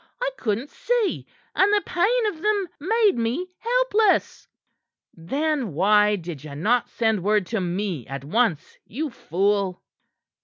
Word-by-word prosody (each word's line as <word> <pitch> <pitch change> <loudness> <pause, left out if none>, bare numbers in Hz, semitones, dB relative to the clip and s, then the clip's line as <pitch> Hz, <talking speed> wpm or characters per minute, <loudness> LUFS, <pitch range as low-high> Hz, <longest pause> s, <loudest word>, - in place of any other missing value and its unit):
I - - -1
couldn't 230 - -2
see, 475 -5 -1 0.3
and 390 +2 +3
the 415 -1 +2
pain 445 +7 +1
of 340 -7 -3
them 415 -2 +1
made 420 +5 +2
me 255 +11 -2
helpless." 460 -4 +1 0.7
"Then 270 - -2
why 210 +4 +4
did 165 -6 -7
ye 145 -2 -8
not 225 +11 +1
send 220 -4 0
word 210 -1 +2
to 220 - +1
me 180 - -3
at 135 0 -6
once, 185 -2 0
you 290 +6 -4
fool?" 195 -1 -1
230 Hz, 140 wpm, -24 LUFS, -, 0.7 s, why